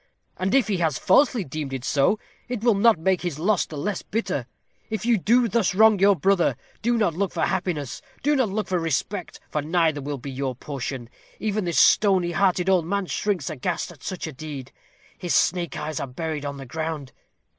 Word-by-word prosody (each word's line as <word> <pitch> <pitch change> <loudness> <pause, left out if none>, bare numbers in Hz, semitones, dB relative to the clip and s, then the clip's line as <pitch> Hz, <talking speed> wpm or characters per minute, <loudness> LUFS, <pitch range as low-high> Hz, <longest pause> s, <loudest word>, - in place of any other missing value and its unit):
And 190 +5 0
if 265 -6 +4
he 200 -3 0
has 160 -6 +1
falsely 240 +2 +3
deemed 140 -2 -5
it 130 -1 -4
so, 145 +10 +2 0.3
it 245 -3 -4
will 235 -2 +5
not 215 +1 +4
make 185 +3 +1
his 175 -5 -3
loss 190 +4 +1
the 155 - -8
less 195 +6 -2
bitter. 185 - -2 0.4
If 220 0 -3
you 240 -1 +4
do 235 +5 +3
thus 220 -4 +1
wrong 215 -1 +6
your 200 +1 +5
brother, 190 +2 +2 0.2
do 235 +1 +2
not 210 -7 +2
look 190 +2 -1
for - - 0
happiness; 175 -8 -2 0.2
do 295 +2 +3
not 260 -6 +2
look 210 +2 -2
for 180 -1 0
respect; 165 +4 -2
for 150 - 0
neither 160 -1 +1
will 145 +1 -4
be 135 +2 -7
your 130 -1 -3
portion. 130 -2 -5 0.3
Even 215 -2 -1
this 170 -2 -1
stony 190 -4 +5
hearted 180 +1 +2
old 180 -4 +3
man 200 +1 0
shrinks 185 -5 -1
aghast 165 +5 -3
at 155 - -16
such 185 -3 -4
a 160 - -5
deed. 135 -2 -7 0.5
His 175 -6 0
snake 175 -1 +1
like - - -4
eyes 155 -2 -3
are - - -3
buried 150 +2 -4
on 140 0 -4
the 135 - -8
ground. 155 0 -4
175 Hz, 210 wpm, -24 LUFS, 150-200 Hz, 0.5 s, wrong